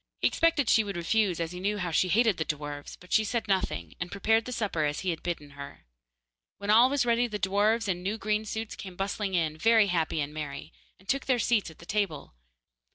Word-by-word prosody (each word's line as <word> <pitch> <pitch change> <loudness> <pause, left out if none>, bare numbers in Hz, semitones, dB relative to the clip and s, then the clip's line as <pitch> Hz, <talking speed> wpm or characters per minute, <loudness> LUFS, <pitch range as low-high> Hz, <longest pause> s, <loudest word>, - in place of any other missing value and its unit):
He - - -1
expected 330 -6 +2
she 220 - +5
would 200 -2 -5
refuse, 185 +1 +1
as 165 0 -2
he 180 - -7
knew 205 +2 -1
she 185 - +2
hated 220 +1 +3
the 160 - 0
dwarfs, 145 -1 -5
but 180 - -10
she 220 - +5
said 225 +1 -2
nothing, 190 -2 -1
and 175 0 -4
prepared 220 +3 +2
the 250 - -6
supper 210 -10 -1
as 145 0 -1
he 185 - 0
had 165 - -5
bidden 155 -5 -4
her. 140 0 -10 0.7
When 200 +2 -1
all 235 +4 +7
was 275 -3 +1
ready, 240 0 +2
the 210 -3 -4
dwarfs, 205 +3 +1
in 180 -2 -1
new 200 +4 -2
green 215 0 -1
suits, 220 +1 -4
came 185 -2 -9
bustling 195 0 -2
in, 160 -3 0
very 225 -1 +5
happy 160 -2 0
and 145 0 -3
merry, 150 -2 -6 0.2
and 190 - -23
took 275 +2 -1
their 255 -2 +3
seats 225 -4 +1
at 160 - -15
the 170 - -14
table. 185 - -2
200 Hz, 225 wpm, -28 LUFS, 170-220 Hz, 0.7 s, all